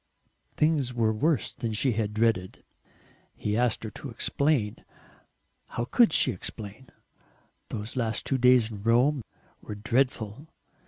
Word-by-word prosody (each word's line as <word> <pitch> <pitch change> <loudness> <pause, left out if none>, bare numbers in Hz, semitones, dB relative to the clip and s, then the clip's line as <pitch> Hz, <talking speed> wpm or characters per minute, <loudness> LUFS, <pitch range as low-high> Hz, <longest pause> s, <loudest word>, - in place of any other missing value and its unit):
Things 145 -5 +1
were 110 -2 +2
worse 150 +5 +1
than 115 -2 -4
she 125 +5 +2
had 105 -2 -2
dreaded; 110 -5 0 0.7
he 105 0 -2
asked 120 -1 +1
her 110 - -5
to 140 - -8
explain. 125 -2 +1 0.9
How 120 - -3
COULD 235 - +4
she 130 - +3
explain? 110 +4 -6 0.8
Those 105 +2 -5
last 115 -3 -1
two 135 - 0
days 125 -2 +5
in 105 -2 -8
Rome 120 +5 +3 0.4
were 105 - -7
dreadful. 120 +3 -1
115 Hz, 130 wpm, -27 LUFS, 110-130 Hz, 0.9 s, days